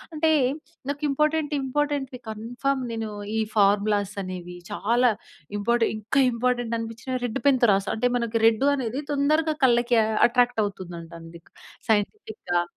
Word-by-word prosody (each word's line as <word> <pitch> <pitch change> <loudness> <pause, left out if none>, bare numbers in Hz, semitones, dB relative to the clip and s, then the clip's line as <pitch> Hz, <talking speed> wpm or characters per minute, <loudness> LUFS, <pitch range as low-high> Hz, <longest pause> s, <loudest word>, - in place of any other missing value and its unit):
అంటే, 315 +1 +2 0.6
నాకు 285 +1 -3
important 300 +1 +1
ఇంపార్టెంట్‌‌వి 270 -1 -2
confirm 245 +5 -2
నేను 225 -1 -3 0.3
ఈ - - +2 0.2
ఫార్ములాసనేవి, 200 -3 0
చాలా 235 +4 +2 0.5
ఇంపాటె 235 +2 +2
ఇంకా 225 +6 +1
ఇంపార్టెంటనిపిచ్చినవి 235 +1 -2
రెడ్డు 240 +4 -4
పెన్‌తో 255 -4 +4
రాస్తా. 195 0 0
అంటే, 245 +3 +2
మనకి 235 -1 -1
రెడ్డూ 225 +5 +2
అనేది 260 0 -3
తొందరగా 305 +2 +1
కళ్ళకీ 240 -1 +3 0.3
అట్రాక్టవుతుందం‌టండీ 175 -9 -2 0.5
సైంటిఫిక్‌గా. 205 - 0
235 Hz, 110 wpm, -25 LUFS, 205-270 Hz, 0.6 s, పెన్‌తో